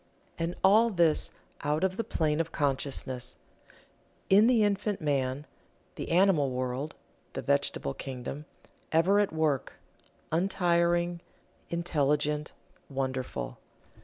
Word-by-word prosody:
And 165 +1 -1
all 215 +5 +6
this 170 -6 +2 0.3
out 150 +3 0
of 190 0 +1
the 230 - -1
plane 155 -7 0
of 165 0 -1
consciousness 130 -3 -2 1.0
in 205 +4 +7
the 240 -3 +4
infant 205 0 0
man 140 -2 -1 0.5
the - - -6
animal 170 -5 +4
world, 130 +3 -3 0.4
the - - -3
vegetable 70 - 0
kingdom 135 +3 -6 0.5
ever 180 +6 +4
at 205 - +2
work, 155 -4 0 0.6
untiring, 175 -1 +2 0.5
intelligent, 150 -3 0 0.4
wonderful. 130 - -3
160 Hz, 105 wpm, -29 LUFS, 135-180 Hz, 1.0 s, in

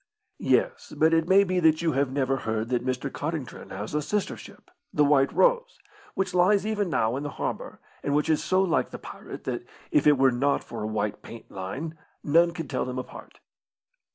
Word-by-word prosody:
"Yes; 475 -1 0
but 160 +1 +4
it 165 0 +2
may 195 +1 +7
be 185 -1 0
that 160 -1 +3
you 165 - +2
have 135 -1 0
lever 135 -1 0
heard 110 -2 -2
that 125 -1 0
Mr. 130 +1 -2
Codrington 150 -3 -5
has 105 +6 -6
a 150 - +1
sister 205 +7 -1
ship, - - -14 0.2
the 150 - +3
White 140 -1 +4
Rose, - - +2 0.4
which 190 -1 -1
lies 190 +3 +4
even 210 -3 0
now 115 -6 +1
in 135 - -3
the 145 - -4
harbour, - - -4 0.2
and 140 - 0
which 150 +1 +2
is 155 -1 +2
so 185 +1 +2
like 165 -9 +1
the - - -7
pirate, - - -10
that, - - -3 0.3
if 150 - +3
it 145 -1 +6
were 135 0 +5
not 135 +3 +1
for 115 - -7
a 105 - -2
white 105 -1 -2
paint 115 - -11
line, 135 +13 -6 0.2
none 170 +3 +4
could 165 -3 -6
tell - - -1
them 125 0 -4
apart." 130 - -9
150 Hz, 210 wpm, -26 LUFS, 130-175 Hz, 0.4 s, may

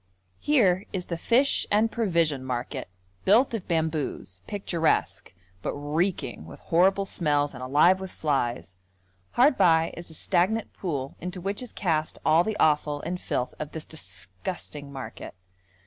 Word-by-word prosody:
Here 200 -10 +3
is 180 -2 -3
the 170 - -3
fish 250 +10 +3
and 215 +2 +3
provision 165 - +1
market, 125 -6 -4 0.3
built 235 +6 +4
of 220 -5 -4
bamboos, 155 - -2
picturesque, 175 -5 0 0.3
but - - -3
reeking 145 - -2
with 80 - -11
horrible 190 +4 +3
smells 145 -6 0
and 125 - -9
alive 150 +8 +4
with 190 0 -6
flies; 125 - -1 0.6
hard 260 +2 +4
by 165 -1 +4
is 170 0 -8
a 160 - -10
stagnant 205 +8 +1
pool 140 -7 -4
into 180 +2 -5
which 195 +5 -3
is 250 - -6
cast 160 -5 -1
all 160 +2 +5
the 215 +2 -2
offal 150 -1 +2
and 180 +2 -4
filth 125 - -2
of 150 0 -5
this 160 - -4
disgusting 140 - -5
market. 135 -1 -8
165 Hz, 145 wpm, -26 LUFS, 145-190 Hz, 0.6 s, all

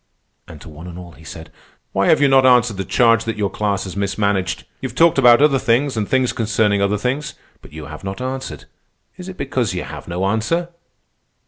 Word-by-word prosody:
And 75 - -12
to - - -13
one 80 +3 -11
and 85 -1 -9
all 90 -1 -10
he 80 0 -17
said: 80 0 -10 0.4
"Why - - +1
have - - +4
you 145 - +4
not 135 -1 +5
answered 125 -5 +4
the 95 - -2
charge 115 +4 +3
that 115 -1 -3
your 100 -2 -1
class 100 -3 -1
has 95 -2 -7
mismanaged? 100 -1 -1 0.2
You - - -3
have - - -14
talked 165 -4 +4
about 120 +1 +6
other 140 -3 +4
things 130 +4 +1
and 105 -2 -2
things 130 -1 +1
concerning 105 -3 +1
other 100 +1 +1
things, 130 +7 -3 0.3
but - - -15
you 80 -1 -9
have 75 +1 -10
not 95 +2 -5
answered. 130 - -5 0.5
Is 180 +1 -8
it 185 - -9
because 125 -8 -2
you 90 - -3
have - - -9
no 90 +2 -2
answer?" 115 - -1
105 Hz, 220 wpm, -19 LUFS, 95-130 Hz, 0.5 s, about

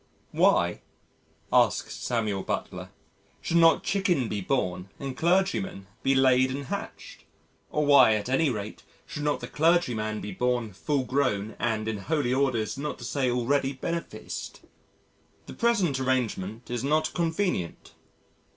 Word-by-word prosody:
"Why," - - +2 0.7
asks - - +3
Samuel 110 -5 -1
Butler, - - -4 0.5
"should 170 - 0
not 165 -1 +5
chicken 175 - +1
be 105 - -2
born 90 -5 -1
and 135 -2 -5
clergymen 190 - 0 0.2
be 135 0 +2
laid 130 -1 +4
and 140 +2 -4
hatched? - - -7 0.5
Or 150 0 0
why, 140 -6 +7
at 105 +1 -3
any 135 +4 +2
rate, 105 -3 -5 0.2
should 165 -2 -6
not 145 -3 0
the 120 - -5
clergyman 125 -11 +1
be 105 - -6
born 120 0 -1
full 140 +8 -1
grown 125 -6 -1
and 110 -2 -1
in 110 -1 -2
Holy 140 +1 0
Orders 130 -3 0
not 150 +1 -4
to - - -11
say 130 +1 0
already 135 +3 +1
beneficed? 170 +5 -5 0.8
The - - -9
present 200 - +1
arrangement 120 -4 -2
is 120 0 -2
not 155 +3 +1
convenient 165 - -2
130 Hz, 140 wpm, -27 LUFS, 110-150 Hz, 0.8 s, why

